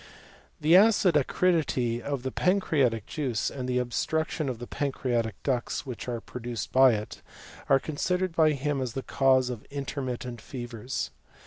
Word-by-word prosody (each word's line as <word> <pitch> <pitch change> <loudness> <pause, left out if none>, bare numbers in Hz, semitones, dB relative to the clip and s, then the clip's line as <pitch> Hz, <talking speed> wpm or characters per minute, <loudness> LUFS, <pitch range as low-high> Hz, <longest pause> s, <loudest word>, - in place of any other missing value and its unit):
The 160 +3 +5
acid 195 -4 +5
acridity 145 -6 +1
of 140 -2 -3
the 130 - -2
pancreatic 140 - +1
juice, 135 -8 -2
and 130 -2 -5
the 125 - +1
obstruction 150 +5 -1
of 125 - -3
the 120 - -7
pancreatic 120 -6 -1
ducts, 125 -1 -1
which 125 -3 -6
are 120 -1 -2
pro 125 +2 -9
duced 120 -1 -4
by 130 -1 +6
it, 105 0 -5 0.5
are 135 - +7
considered 180 +5 -1
by 155 -2 +4
him 140 0 -1
as 125 -3 -3
the 135 - -4
cause 130 -2 +3
of 115 -3 -7
intermittent 130 -4 -4
fevers. 120 0 -5
130 Hz, 155 wpm, -28 LUFS, 120-150 Hz, 0.5 s, are